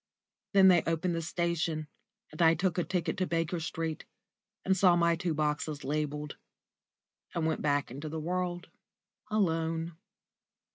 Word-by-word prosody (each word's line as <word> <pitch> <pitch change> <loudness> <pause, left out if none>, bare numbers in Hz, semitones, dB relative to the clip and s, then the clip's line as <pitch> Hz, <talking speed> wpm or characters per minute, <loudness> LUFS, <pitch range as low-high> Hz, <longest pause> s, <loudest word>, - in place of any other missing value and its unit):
Then 190 -1 +8
they 175 -2 +6
opened 165 +2 0
the 165 - -1
station, 165 -2 -1 0.4
and - - -5
I 165 0 +6
took 180 -1 0
a - - +2
ticket 170 -3 -1
to 185 -1 0
Baker 165 +1 -1
Street, 160 -1 -4 0.6
and 190 - +3
saw 180 -2 +5
my 170 -1 +3
two 170 -2 -2
boxes 150 0 -1
labelled, 150 0 -3 1.0
and 165 -2 0
went 160 0 0
back 145 -3 +1
into 145 +5 -6
the 160 +1 -4
world 175 +2 -2 0.6
alone. 165 -5 0
165 Hz, 145 wpm, -30 LUFS, 155-175 Hz, 1.0 s, Then